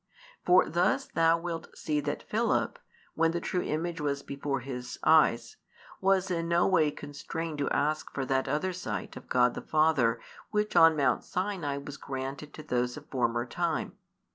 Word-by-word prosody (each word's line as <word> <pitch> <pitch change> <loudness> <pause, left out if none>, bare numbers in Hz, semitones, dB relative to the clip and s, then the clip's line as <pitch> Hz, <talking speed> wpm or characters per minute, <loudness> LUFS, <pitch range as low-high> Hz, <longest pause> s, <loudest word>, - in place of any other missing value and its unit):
For 180 +1 +5
thus 195 - +1
thou 165 0 +3
wilt 165 -1 -6
see 150 -1 -1
that 145 0 -3
Philip, 225 +2 0 0.3
when 165 0 +2
the 170 - -1
true 180 +1 -1
Image 165 +1 -2
was 140 -1 -1
before 140 -1 -3
his 125 -1 -6
eyes, 160 - +4 0.4
was 190 -1 +2
in 165 -1 -1
no 170 +1 +3
way 165 -5 +3
constrained 150 +2 -6
to 140 - 0
ask 155 +1 0
for 135 - -3
that 130 0 0
other 185 +5 -1
sight 180 - -5
of - - -11
God 125 -1 +3
the - - -6
Father 155 -7 +2 0.3
which 210 -1 -1
on 165 -2 +7
Mount 140 - +2
Sinai 180 -7 -2
was 140 0 -7
granted 135 +2 -6
to 155 - -9
those 125 -1 -1
of 150 - -10
former 120 -2 0
time. 120 - -2
155 Hz, 170 wpm, -29 LUFS, 140-170 Hz, 0.4 s, on